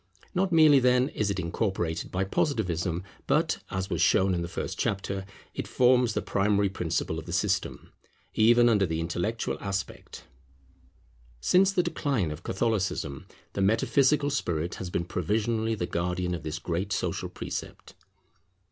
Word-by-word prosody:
Not 190 Hz, 0 st, +1 dB
merely, 155 Hz, -4 st, +7 dB
then, 125 Hz, +1 st, +3 dB
is 105 Hz, -1 st, -1 dB
it 100 Hz, -1 st, -1 dB
incorporated 85 Hz, -2 st, -2 dB
by 95 Hz, +1 st, -1 dB
Positivism, 90 Hz, -, -1 dB, 0.2 s
but, -, -, +2 dB
as 95 Hz, 0 st, -2 dB
was -, -, 0 dB
shown 95 Hz, 0 st, +4 dB
in 85 Hz, -, -1 dB
the 85 Hz, -, -3 dB
first -, -, -5 dB
chapter, 95 Hz, 0 st, -2 dB, 0.3 s
it -, -, -4 dB
forms 125 Hz, -2 st, +3 dB
the -, -, -1 dB
primary 100 Hz, 0 st, +1 dB
principle 90 Hz, -4 st, -2 dB
of -, -, -10 dB
the -, -, -5 dB
system, -, -, -1 dB, 0.4 s
even 120 Hz, +2 st, +5 dB
under 105 Hz, -5 st, +3 dB
the 80 Hz, 0 st, -2 dB
intellectual 85 Hz, +7 st, -2 dB
aspect. 100 Hz, -1 st, -5 dB, 1.2 s
Since 190 Hz, -, +4 dB
the 180 Hz, -3 st, +2 dB
decline 135 Hz, -, -1 dB
of 75 Hz, +3 st, -7 dB
Catholicism 95 Hz, -, -2 dB, 0.3 s
the 100 Hz, -, -2 dB
metaphysical 140 Hz, +8 st, +3 dB
spirit 85 Hz, -, -1 dB
has 95 Hz, -, -4 dB
been 85 Hz, 0 st, -2 dB
provisionally 110 Hz, +6 st, 0 dB
the 90 Hz, -, -2 dB
guardian 90 Hz, +1 st, -2 dB
of 85 Hz, -, -4 dB
this 80 Hz, 0 st, -4 dB
great 85 Hz, +4 st, -3 dB
social -, -, -2 dB
precept. -, -, -7 dB
100 Hz, 150 wpm, -28 LUFS, 90-120 Hz, 1.2 s, merely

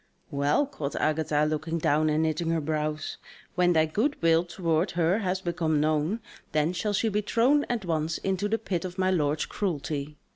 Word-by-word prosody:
"Well," 145 Hz, -, +2 dB
quoth 155 Hz, -, -5 dB
Agatha 155 Hz, -1 st, +1 dB
looking 155 Hz, +2 st, -2 dB
down 155 Hz, 0 st, +2 dB
and 155 Hz, +1 st, +2 dB
knitting 160 Hz, +1 st, 0 dB
her 165 Hz, 0 st, +1 dB
brows, 155 Hz, 0 st, -2 dB, 0.4 s
"when 175 Hz, 0 st, +3 dB
thy 160 Hz, -1 st, +4 dB
good 220 Hz, -, -1 dB
will 165 Hz, 0 st, +4 dB
towards 175 Hz, 0 st, -1 dB
her 175 Hz, +4 st, +2 dB
has 190 Hz, -2 st, -1 dB
become 170 Hz, -4 st, 0 dB
known, 155 Hz, +8 st, +1 dB, 0.3 s
then 155 Hz, +3 st, +2 dB
shall 205 Hz, +3 st, -1 dB
she 215 Hz, +3 st, +1 dB
be 210 Hz, -1 st, +1 dB
thrown 255 Hz, +7 st, +3 dB
at 235 Hz, -5 st, -2 dB
once 160 Hz, -1 st, -1 dB
into 195 Hz, +2 st, -1 dB
the 225 Hz, -, +1 dB
pit 190 Hz, -6 st, -3 dB
of 185 Hz, 0 st, -6 dB
my 185 Hz, 0 st, +2 dB
lord's 150 Hz, -4 st, +1 dB
cruelty. 150 Hz, -5 st, -3 dB
165 Hz, 185 wpm, -27 LUFS, 155-190 Hz, 0.4 s, thy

